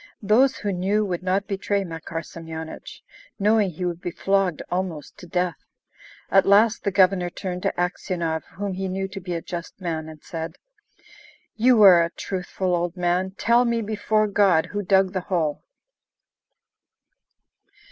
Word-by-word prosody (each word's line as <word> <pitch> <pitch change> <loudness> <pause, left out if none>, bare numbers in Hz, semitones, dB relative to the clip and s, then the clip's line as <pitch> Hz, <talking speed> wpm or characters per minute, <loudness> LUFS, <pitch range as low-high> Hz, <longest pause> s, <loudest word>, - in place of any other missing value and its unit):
Those 245 +6 +4
who 205 - -2
knew 200 +4 +1
would 180 -3 -3
not 190 +2 0
betray 200 0 -1
Makar 165 -1 -6
Semyonich, 160 0 -9 0.3
knowing 210 0 +3
he 180 +2 -5
would 175 -1 -3
be - - -3
flogged 195 -2 0
almost 180 -5 -3
to 180 - -11
death. 180 0 -1 0.7
At 195 - +5
last 210 +3 +4
the 200 - +1
Governor 185 -2 +3
turned 180 0 -5
to - - 0
Aksionov 175 -2 -2
whom 200 +1 -3
he 190 +1 -3
knew 190 +1 -2
to 195 +1 -7
be 175 -1 -4
a 165 - -4
just 170 +1 -7
man, 160 -4 -4
and 155 -1 -13
said: 165 0 -6 1.0
"You 240 +1 +4
are 180 -4 +8
a 165 - -1
truthful 185 0 -3
old 175 +1 -2
man; 180 +2 0
tell 235 +1 +4
me, 235 -1 0
before 215 0 +1
God, 195 -5 +3
who 205 - -2
dug 190 -1 +3
the 185 - 0
hole?" 160 -5 0
185 Hz, 155 wpm, -24 LUFS, 170-200 Hz, 1.0 s, are